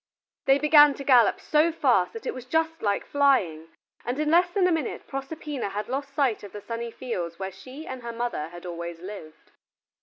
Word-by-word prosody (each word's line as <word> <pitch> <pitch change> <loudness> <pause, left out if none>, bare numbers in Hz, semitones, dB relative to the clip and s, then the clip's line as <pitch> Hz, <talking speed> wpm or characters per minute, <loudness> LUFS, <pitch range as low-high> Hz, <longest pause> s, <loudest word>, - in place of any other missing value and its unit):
They 270 0 +5
began 295 -1 +6
to 275 - -7
gallop 245 -6 +5
so 310 +2 +2
fast 330 - +2
that 455 - -8
it - - -2
was 255 -1 -8
just 320 +4 0
like 205 -2 0
flying, 205 - +2 0.4
and 245 +2 -3
in 305 0 0
less 355 +2 +5
than 375 +1 +1
a 365 - +3
minute 320 -6 -2
Proserpina 275 -3 -5
had 205 +2 -4
lost 275 +2 -4
sight 270 -7 +1
of 205 - -11
the 205 - -7
sunny 230 +3 -5
fields 175 -9 -5
where 190 0 -4
she 260 +11 -11
and 260 -1 -7
her 235 0 -5
mother 230 -9 -3
had 175 +1 -11
always 170 -1 -6
lived. 180 -4 -10
255 Hz, 205 wpm, -26 LUFS, 200-295 Hz, 0.4 s, began